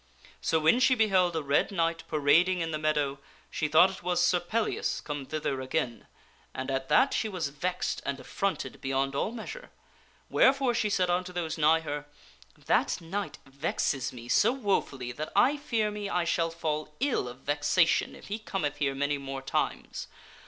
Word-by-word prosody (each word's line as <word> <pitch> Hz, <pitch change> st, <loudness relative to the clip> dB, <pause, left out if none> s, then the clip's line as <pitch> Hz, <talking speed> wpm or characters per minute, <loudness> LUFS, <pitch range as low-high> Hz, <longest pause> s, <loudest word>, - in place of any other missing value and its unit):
So 160 Hz, -, +2 dB
when 160 Hz, +10 st, +4 dB
she 260 Hz, 0 st, +5 dB
beheld 190 Hz, -6 st, +3 dB
a 160 Hz, -, -1 dB
red 140 Hz, +1 st, +2 dB
knight 165 Hz, -4 st, -1 dB
parading 160 Hz, +5 st, +3 dB
in 165 Hz, 0 st, -2 dB
the 155 Hz, -, -2 dB
meadow, 150 Hz, -2 st, 0 dB, 0.3 s
she 155 Hz, -, -1 dB
thought 170 Hz, +5 st, +6 dB
it 190 Hz, -, -10 dB
was 180 Hz, 0 st, 0 dB
Sir 175 Hz, 0 st, +3 dB
Pellias 215 Hz, +6 st, -1 dB
come 145 Hz, -3 st, -5 dB
thither 150 Hz, -4 st, -2 dB
again, 130 Hz, -3 st, -2 dB, 0.5 s
and 130 Hz, +1 st, -3 dB
at 135 Hz, 0 st, -2 dB
that 275 Hz, -, +4 dB
she 220 Hz, -, 0 dB
was 180 Hz, -7 st, -2 dB
vexed 180 Hz, +6 st, -2 dB
and 140 Hz, -, -3 dB
affronted 195 Hz, 0 st, -3 dB
beyond 135 Hz, 0 st, 0 dB
all 140 Hz, +9 st, -1 dB
measure. 240 Hz, -, -8 dB, 0.6 s
Wherefore 270 Hz, -2 st, +3 dB
she 225 Hz, -3 st, +1 dB
said 180 Hz, -3 st, +1 dB
unto 180 Hz, +1 st, -1 dB
those 175 Hz, -3 st, -3 dB
nigh 160 Hz, +1 st, +4 dB
her, 145 Hz, -2 st, -5 dB, 0.3 s
" -, -, -26 dB
That -, -, +2 dB
knight 170 Hz, -2 st, -4 dB
vexes 135 Hz, -1 st, -1 dB
me 120 Hz, -1 st, -10 dB
so 210 Hz, -, +4 dB
wofully 190 Hz, -, -1 dB
that 150 Hz, +5 st, -5 dB
I 255 Hz, +8 st, +5 dB
fear 225 Hz, -7 st, -1 dB
me 205 Hz, -1 st, -4 dB
I 180 Hz, -, +1 dB
shall 170 Hz, 0 st, +1 dB
fall 155 Hz, -2 st, -3 dB
ill 265 Hz, -, 0 dB
of 125 Hz, +2 st, -9 dB
vexation 145 Hz, +4 st, +2 dB
if -, -, -13 dB
he 210 Hz, +2 st, -4 dB
cometh 170 Hz, -9 st, -3 dB
here 140 Hz, -2 st, 0 dB
many 145 Hz, +1 st, 0 dB
more 135 Hz, -1 st, -6 dB
times. -, -, -2 dB
160 Hz, 180 wpm, -29 LUFS, 145-195 Hz, 0.6 s, thought